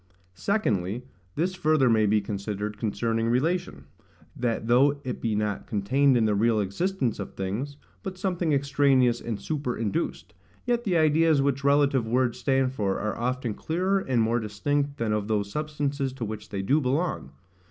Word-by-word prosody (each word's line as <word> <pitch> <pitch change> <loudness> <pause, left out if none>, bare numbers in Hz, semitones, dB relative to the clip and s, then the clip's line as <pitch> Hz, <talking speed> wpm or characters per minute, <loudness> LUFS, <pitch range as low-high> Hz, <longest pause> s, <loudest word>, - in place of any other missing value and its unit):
Secondly, 110 - -1 0.3
This 175 +5 0
further 155 -6 +2
may 110 -2 +4
be 105 +1 +3
considered 105 +1 -4
concerning 115 +1 -1
relation, 145 - -1 0.5
that 115 -2 -1
though 135 +5 +4
it 125 - -4
be 110 -2 0
not 105 -1 -2
contained 130 +6 +2
in 115 - +3
the 105 - +2
real 110 +2 +2
existence 120 - -1
of 100 - -6
things, 110 +10 -4 0.2
but 190 -3 -6
something 180 -3 -1
extraneous 140 -3 +3
and 115 -3 -3
superinduced, 125 +1 -3 0.3
yet 240 -1 0
the 180 -4 +2
ideas 155 -1 +4
which 140 0 0
relative 140 -4 +3
words 125 +1 +1
stand 130 +1 +1
for 100 -6 -1
are 110 0 -2
often 125 -1 -2
clearer 185 - 0
and 130 -10 +1
more 115 +2 +1
distinct 140 +7 -1
than 110 -4 0
of 105 -1 -1
those 105 -2 -1
substances 145 -2 -2
to 125 -3 -4
which 105 0 -7
they 100 -2 -3
do 140 +10 +2
belong. 140 - -1
125 Hz, 165 wpm, -26 LUFS, 110-145 Hz, 0.5 s, may